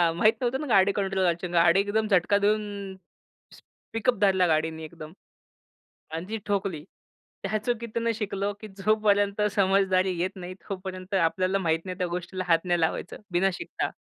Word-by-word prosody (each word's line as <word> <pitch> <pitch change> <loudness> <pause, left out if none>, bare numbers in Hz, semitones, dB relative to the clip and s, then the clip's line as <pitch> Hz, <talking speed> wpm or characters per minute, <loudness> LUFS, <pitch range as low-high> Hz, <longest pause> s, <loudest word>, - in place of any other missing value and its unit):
माहीत 215 +6 +4
नव्हतं 255 +2 0
ना 300 - -4
गाडी 200 -4 +5
कंट्रोल 195 -1 -1
करायची. 175 0 0
गाडी 175 +2 +4
एकदम 215 +2 +1
झटका 195 0 +3
देऊन 205 -1 -1 1.0
पिकअप 225 +1 +1
धरला 190 -2 +4
गाडीने 160 0 0
एकदम.आणि 160 +2 -12 0.9
जी 220 +3 -4
ठोकली. 195 -6 -1 0.6
त्या 200 +2 0
चुकीतनं 235 -1 -1
शिकलो 200 -2 -2
की 215 - -7
जोपर्यंत 205 0 +2
समजदारी 190 -2 +2
येत 185 +2 0
नाही 185 -1 -7 0.2
तोपर्यंत 185 0 -6
आपल्याला 185 +2 +2
माहित 165 -1 0
नाही 185 -1 -5
त्या 180 -2 -1
गोष्टीला 180 +2 -4
हात 165 0 +3
नाही 175 -1 +1
लावायचं 160 +2 -1
बिना 180 +2 +3
शिकता. - - -4
195 Hz, 150 wpm, -27 LUFS, 180-205 Hz, 1.0 s, गाडी